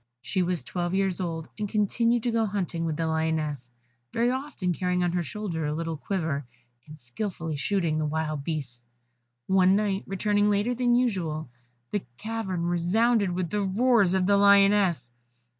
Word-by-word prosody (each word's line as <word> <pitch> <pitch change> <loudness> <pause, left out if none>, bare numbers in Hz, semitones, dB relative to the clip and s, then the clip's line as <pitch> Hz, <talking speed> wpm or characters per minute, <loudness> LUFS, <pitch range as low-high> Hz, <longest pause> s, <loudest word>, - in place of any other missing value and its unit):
She 185 +8 -1
was 180 -2 -1
twelve 175 0 -2
years 195 -1 0
old, 165 -3 -3
and 210 -1 -2
continued 230 +3 +1
to 240 - 0
go 225 -1 +1
hunting 180 -4 -2
with 155 -2 -2
the 165 - -1
Lioness, 160 -5 -1 0.4
very 235 +2 +1
often 260 -9 -2
carrying 180 +1 0
on 175 - +1
her 175 0 0
shoulder 175 -2 -4
a 150 - -2
little 165 0 -3
quiver, 160 -4 -2 0.4
and 155 0 -11
skilfully 160 - -5
shooting 165 0 0
the 155 - 0
wild 155 -1 -2
beasts. 135 -7 -5 0.6
One 190 0 +4
night, 200 -1 0
returning 205 +1 +1
later 205 +4 +1
than 245 0 +2
usual, 170 - -1 0.4
the 205 - 0 0.2
cavern 215 -6 -3
resounded 200 +5 +2
with 180 -1 -2
the 210 0 0
roars 200 -1 +3
of 185 -1 +2
the 200 +1 +4
Lioness. 200 -9 +4
185 Hz, 165 wpm, -27 LUFS, 160-205 Hz, 0.6 s, One